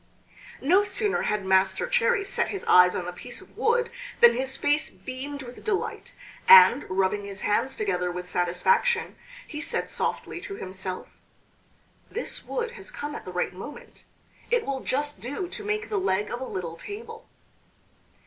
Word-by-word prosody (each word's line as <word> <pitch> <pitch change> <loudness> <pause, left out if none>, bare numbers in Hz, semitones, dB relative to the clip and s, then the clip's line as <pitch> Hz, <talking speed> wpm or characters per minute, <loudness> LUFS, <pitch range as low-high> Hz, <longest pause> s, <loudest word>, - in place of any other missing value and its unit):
No 365 +8 +5
sooner 410 0 0
had 210 -2 -1
Master 190 - +3
Cherry 485 -3 +2
set 395 - 0
his 395 - -4
eyes 180 0 +7
on 180 - -2
the 180 - -5
piece 245 +7 -5
of 380 - -15
wood 475 +1 +1 0.3
than 235 0 +8
his 265 +2 -2
face 295 +1 +1
beamed 260 +8 -7
with 245 0 -11
delight; 420 -3 -3 0.3
and, 470 -10 +9
rubbing 190 +2 +1
his 195 -1 -7
hands 265 +6 +1
together 180 -4 -1
with 180 0 -6
satisfaction, 460 - +1 0.3
he 300 -1 -6
said - - -2
softly - - -3
to 395 - -6
himself: 185 - -5 1.0
"This 470 - -5
wood 475 -2 -3
has 485 - -9
come 290 0 -6
at - - -7
the 185 - -6
right 180 0 -1
moment; 195 +11 -10 0.5
it 480 -1 +2
will 275 -1 -2
just 290 +3 -2
do 285 +9 -4
to 430 +2 -5
make 425 +1 -2
the 420 - 0
leg 210 - 0
of 240 - -4
a - - -2
little 170 -7 -5
table." 455 - -8
270 Hz, 170 wpm, -26 LUFS, -, 1.0 s, and